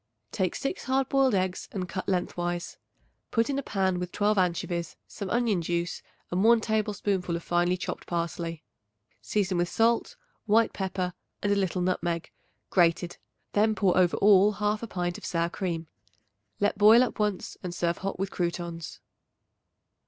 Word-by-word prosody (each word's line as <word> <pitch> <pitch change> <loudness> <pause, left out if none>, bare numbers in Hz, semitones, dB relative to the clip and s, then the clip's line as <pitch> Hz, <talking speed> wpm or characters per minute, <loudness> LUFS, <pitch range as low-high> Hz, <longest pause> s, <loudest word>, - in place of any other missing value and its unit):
Take 185 -2 -1
6 275 - -3
hard 265 0 +1
boiled 270 -4 +3
eggs 185 -1 -1
and 185 -2 -3
cut 185 +2 -4
lengthwise. 175 -1 -2 0.5
Put 230 +3 +1
in 275 - 0
a - - -1
pan 190 -7 0
with 180 0 -4
12 210 +1 +2
anchovies, 175 -2 -1
some 200 -2 -6
onion 230 -6 +1
juice 170 +1 -2 0.3
and 180 +2 +1
1 230 +1 +6
tablespoonful 205 -5 -1
of 170 - -5
finely 175 +1 +1
chopped - - -5
parsley. 170 -1 -3 0.6
Season 190 -4 0
with 175 0 +1
salt, 230 - +1 0.3
white 225 +2 +4
pepper 185 -2 -2 0.3
and 205 0 +3
a - - +2
little 185 -2 0
nutmeg, 175 -2 -1 0.4
grated. 175 -1 +2 0.4
Then 215 +1 +3
pour 195 -4 +2
over 180 -2 +3
all 205 0 +6
1/2 210 +2 -1
pint 175 -2 -2
of - - -20
sour 170 -1 0
cream. 170 -4 -3 0.7
Let 205 0 +1
boil 220 +4 +8
up 245 - -4
once 210 -3 -1
and 180 - -4
serve 170 -1 -1
hot 195 +1 -3
with 195 +1 -2
croutons. 170 -1 -4
185 Hz, 160 wpm, -28 LUFS, 175-210 Hz, 0.7 s, boil